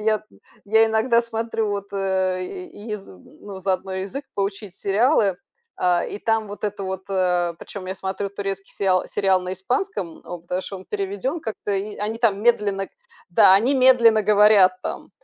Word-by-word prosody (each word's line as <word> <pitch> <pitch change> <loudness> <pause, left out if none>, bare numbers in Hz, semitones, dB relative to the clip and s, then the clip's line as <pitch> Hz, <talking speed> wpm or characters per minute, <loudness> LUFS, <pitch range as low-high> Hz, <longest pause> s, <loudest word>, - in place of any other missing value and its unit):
я 215 0 +1 0.4
я 220 +2 +5
иногда 225 +2 +2
смотрю, 225 -1 -2
вот, 200 0 -5
э, 190 -2 0
й 235 - -9
ез 210 -2 -5
ну, 190 - -12
заодно 190 0 -2
язык 195 +9 -4
поучить, 200 -1 -3
сериалы, 205 - +2 0.4
а, 180 -1 +2
и - - -6
там 225 -1 0
вот 205 +1 -7
это 205 -1 -3
вот, 190 0 -4
э. 180 -2 +1
Причём 200 -2 -8
я 190 - -3
смотрю 190 +1 -4
турецкий 195 -1 -5
сериал 185 -2 +1
сериал 190 -2 +1
на 180 0 -4
испанском. 190 - -3
О, 175 - -7
потому 180 +2 -4
что 195 - -7
он 185 - -12
переведён 205 - -3
как-то, 220 -5 -5
и 200 +2 -3
они 210 +2 -3
там 215 -4 +2
медленно 205 -4 +1 0.4
да, 180 +1 +6
они 230 +9 +4
медленно 245 -4 +6
говорят 210 -2 +6
там, - - -5
200 Hz, 170 wpm, -22 LUFS, 190-220 Hz, 0.4 s, да